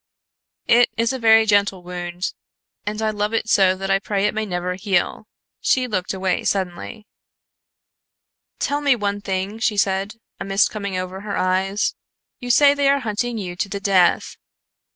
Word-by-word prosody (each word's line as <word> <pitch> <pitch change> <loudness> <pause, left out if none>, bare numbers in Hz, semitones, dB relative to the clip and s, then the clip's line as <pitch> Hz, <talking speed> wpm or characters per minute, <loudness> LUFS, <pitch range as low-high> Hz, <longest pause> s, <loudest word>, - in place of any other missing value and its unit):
"It 240 +1 +5
is 230 +3 +1
a 260 - -4
very 225 -1 +5
gentle 205 -3 +2
wound, 175 0 -5 0.5
and 215 +1 -3
I 215 - +1
love 210 +1 -2
it 225 - -1
so 190 -4 +4
that 195 +1 -3
I 195 - +3
pray 200 0 -1
it 210 - +1
may 220 0 -2
never 180 -1 -2
heal." 190 +2 -1 0.3
She 255 -1 +2
looked 190 -7 -2
away 190 -1 -1
suddenly. 190 +3 -3 1.5
"Tell 290 +1 -1
me 280 -3 +3
one 205 -2 -2
thing," 195 +3 -3
she 220 -2 0
said, 195 +2 0 0.2
a - - -4
mist 195 +1 +2
coming 200 -3 -4
over 185 +1 -5
her 205 -1 -4
eyes. 190 +2 0 0.5
"You 245 - -7
say 280 +3 +6
they 285 -1 +2
are 280 0 +2
hunting 230 +1 -2
you 180 -4 -5
to 195 - -2
the 200 - -4
death. 190 -3 +2
200 Hz, 175 wpm, -21 LUFS, 190-220 Hz, 1.5 s, say